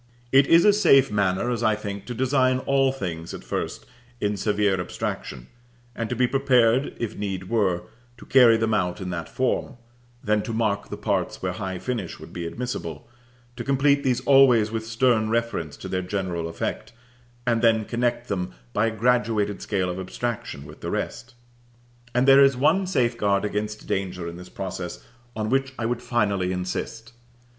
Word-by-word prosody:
It 135 +1 +6
is 165 +1 +6
a 210 - +7
safe 135 - +5
manner, 100 +3 +1
as 120 -2 -2
I 110 -2 +3
think, 100 -2 -6
to 120 - -5
design 130 +1 +2
all 135 -1 +3
things 85 -10 -5
at - - -10
first - - -4 0.3
in 105 0 0
severe 100 -2 +1
abstraction, 65 -7 -5 0.5
and 115 -1 -3
to 125 - -2
be 125 +1 +3
prepared, 130 -1 +2
if 115 -3 -4
need 95 -2 -4
were, 100 -6 +1 0.3
to - - -13
carry 120 -4 +6
them 110 0 0
out 90 -3 0
in 90 -2 -4
that 85 -2 -5
form; 130 +2 -1 0.5
then 105 0 +2
to 115 - -5
mark 105 -3 -1
the - - -5
parts - - -2
where 90 - 0
high 95 0 -4
finish 110 -4 -4
would - - -12
be 85 -1 -4
admissible, 85 -8 -5 0.5
to 120 - -5
complete 140 +1 +2
these 125 -2 +1
always 125 -6 +5
with 110 0 -4
stern 115 -1 +2
reference 115 -10 -2
to - - -8
their 95 - -1
general 90 -3 -3
effect, 85 - -4 0.5
and 115 -2 +1
then 110 -2 +3
connect 120 +1 -1
them 90 -9 -3 0.2
by 115 - +2
a 110 -1 -4
graduated 110 -3 +1
scale 95 -3 -1
of 90 +1 -4
abstraction 95 -6 -4
with - - -13
the - - -4
rest. 120 0 -4 0.8
And 125 +2 +3
there 135 +1 +8
is 135 -2 +4
one 185 +8 +3
safeguard 120 - +1
against 105 +1 -3
danger 90 -3 -3
in 85 - -6
this 90 0 -11
process 95 -2 -6 0.3
on 110 0 -2
which 135 0 +1
I 115 - -2
would 120 +1 -1
finally 100 -7 0
insist. 115 +6 -4
110 Hz, 180 wpm, -24 LUFS, 95-125 Hz, 0.8 s, there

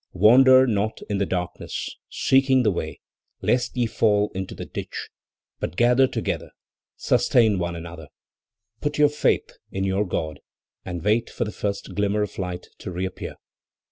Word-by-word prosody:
"Wander 130 +7 +7
not 110 -2 -1
in 100 - 0
the 100 - 0
darkness, 90 -2 -4
seeking 135 -1 +3
the 105 - +3
way, 80 -3 -5 0.4
lest 125 0 +1
ye 120 - +2
fall 105 -2 +2
into 95 0 -5
the - - -6
ditch; - - -6 0.5
but - - -4
gather 125 +5 +4
together, - - -3 0.5
sustain 110 -6 +3
one 85 -1 -2
another, 85 -2 -8 0.7
put 145 0 -2
your 150 -1 +5
faith 150 +1 +1 0.2
in 95 - -3
your 95 +1 0
God 80 -4 -3 0.4
and 90 -3 -5
wait 110 +3 +2
for - - -2
the 105 - -4
first 100 -1 -4
glimmer 105 +1 +1
of 105 - -6
light 90 -1 -4
to - - -6
reappear. 90 +1 -4
105 Hz, 155 wpm, -24 LUFS, 90-120 Hz, 0.7 s, Wander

